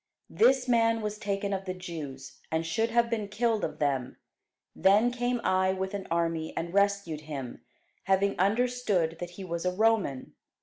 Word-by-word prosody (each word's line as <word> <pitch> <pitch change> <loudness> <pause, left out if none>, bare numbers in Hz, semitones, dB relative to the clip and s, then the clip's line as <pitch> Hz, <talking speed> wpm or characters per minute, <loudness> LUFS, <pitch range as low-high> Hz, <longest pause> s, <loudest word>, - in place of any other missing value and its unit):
This 265 - +4
man 230 -2 +3
was 210 0 -3
taken 200 0 -2
of 190 0 -3
the 185 -1 -4
Jews, 155 -7 -8
and 160 +1 0
should 225 +8 0
have 235 0 +3
been 225 -3 -2
killed 220 +1 0
of - - -3
them: 135 -3 -1 0.6
then 210 +5 +4
came 245 0 -1
I 185 0 +2
with 190 +1 -3
an 200 -2 -5
army, 165 -1 -1
and 170 +1 -3
rescued 200 -6 +1
him, 140 -5 -7 0.4
having 195 +1 +2
understood 205 -5 +1
that 175 - -5
he 195 - -6
was 170 -2 -4
a 180 - +1
Roman. 205 -9 +1
195 Hz, 170 wpm, -29 LUFS, 165-225 Hz, 0.6 s, This